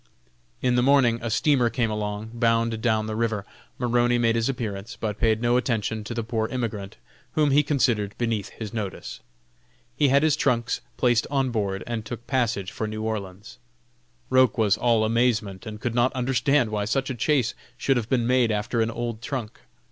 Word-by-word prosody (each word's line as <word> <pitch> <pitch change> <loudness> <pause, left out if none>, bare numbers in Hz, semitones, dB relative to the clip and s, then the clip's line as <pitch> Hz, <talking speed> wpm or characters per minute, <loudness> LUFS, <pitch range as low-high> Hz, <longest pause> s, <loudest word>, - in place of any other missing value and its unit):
In 125 - +3
the 125 - +3
morning 125 -3 +4
a 120 - -3
steamer 125 +1 +3
came 115 -2 0
along, 105 +1 -4
bound 115 -1 +1
down 110 -2 +1
the 110 0 -4
river. 110 -3 -1 0.3
Maroney 120 0 +2
made 115 -1 +2
his 115 +2 +1
appearance, 115 -3 -4
but 105 -2 -3
paid 110 0 +2
no 120 +1 +3
attention 110 -4 -1
to 120 - -5
the 115 - -2
poor 110 -1 -1
immigrant, 110 -6 -4 0.4
whom 150 -2 +2
he 145 +2 +5
considered 125 -8 0
beneath 115 -4 -1
his 110 0 -8
notice. 105 -5 -5 0.8
He 145 - +3
had 140 +2 +4
his 155 -2 +4
trunks 120 -5 0 0.2
placed 120 -2 +2
on 135 -3 0
board, 100 -4 -2
and 115 -2 -3
took 120 +2 -7
passage 115 -8 -1
for 110 - -3
New 110 0 -5
Orleans. 105 -1 -5 0.7
Roch 130 -3 +4
was 105 -3 +3
all 115 -1 +2
amazement, 110 -3 0
and 105 -1 -7
could 120 +1 -2
not 120 +2 +3
understand 130 0 +1
why 105 -1 -1
such 135 +5 -1
a - - -1
chase 125 -1 +1 0.2
should 135 +1 +1
have 115 -1 -3
been 125 -3 +2
made 125 -2 +3
after 105 +2 -1
an 110 - +1
old 115 -1 -4
trunk. 120 -4 -5
115 Hz, 185 wpm, -25 LUFS, 110-125 Hz, 0.8 s, he